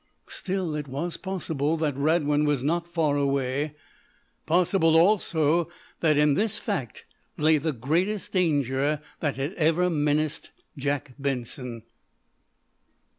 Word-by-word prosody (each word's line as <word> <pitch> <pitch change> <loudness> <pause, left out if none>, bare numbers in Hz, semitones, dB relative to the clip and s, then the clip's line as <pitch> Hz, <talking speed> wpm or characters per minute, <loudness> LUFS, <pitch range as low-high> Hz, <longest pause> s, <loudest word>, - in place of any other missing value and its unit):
Still, 185 -4 -2
it 150 -1 -4
was 145 +6 -3
possible 165 -5 -2
that 155 -3 -1
Radwin 150 0 +2
was 145 -4 +1
not 170 +4 0
far 160 -4 +1
away. 140 +1 0 0.7
Possible, 165 -1 +3
also, 170 -3 +3 0.3
that 155 -3 +3
in 150 -1 +4
this 210 +5 0
fact 175 - -4 0.3
lay 155 0 +4
time 150 -2 -2
greatest 180 - 0
danger 145 -5 +1 0.2
that 145 -3 -1
had 140 +6 -3
ever 170 +2 +2
menaced 150 -1 0 0.3
Jack 140 -1 -2
Benson. 125 -3 -4
150 Hz, 120 wpm, -26 LUFS, 140-170 Hz, 0.7 s, in